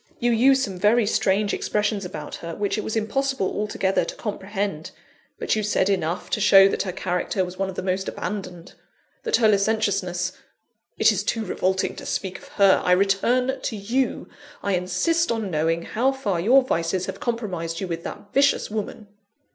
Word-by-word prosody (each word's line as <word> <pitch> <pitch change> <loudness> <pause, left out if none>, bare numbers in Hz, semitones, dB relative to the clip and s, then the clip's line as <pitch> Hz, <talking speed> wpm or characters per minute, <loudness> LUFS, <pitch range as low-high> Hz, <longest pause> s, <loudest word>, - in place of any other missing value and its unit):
You 240 0 +1
used 265 +4 +4
some 190 -5 -4
very 215 +4 +4
strange 200 0 +1
expressions 210 -1 -1
about 180 - -7
her, 165 -1 -7
which 205 -1 -1
it 215 - -3
was 220 - -3
impossible 265 +1 0
altogether 200 -2 0
to - - -6
comprehend; 200 -5 -4 0.5
but - - 0
you 215 - 0
said 200 -2 +1
enough 180 -1 -1
to 215 - 0
show 195 -1 +7
that - - -1
her 190 - -2
character 185 +1 -1
was 180 +1 -10
one 195 0 0
of 190 - -7
the - - -4
most 190 0 -1
abandoned; 185 -4 -6 0.5
that 455 - +1
her 225 - +4
licentiousness 195 -4 +1 0.7
it - - +5
is - - -1
too 225 -2 -1
revolting 190 0 -1
to - - -8
speak 190 -1 -3
of - - -15
her 195 -2 +4
I 180 - +4
return 235 +8 +2
to 225 - -3
you. 230 +6 -1 0.4
I 200 - 0
insist 185 - +1
on 220 -4 -2
knowing 165 +2 0
how 255 +8 0
far 205 -10 -2
your 250 +9 +5
vices 175 -4 -1
have - - -6
compromised 180 -9 -3
you 190 - -3
with 170 -1 -4
that 205 - -9
vicious 275 -5 +2
woman." 215 0 -5
200 Hz, 185 wpm, -24 LUFS, 185-220 Hz, 0.7 s, show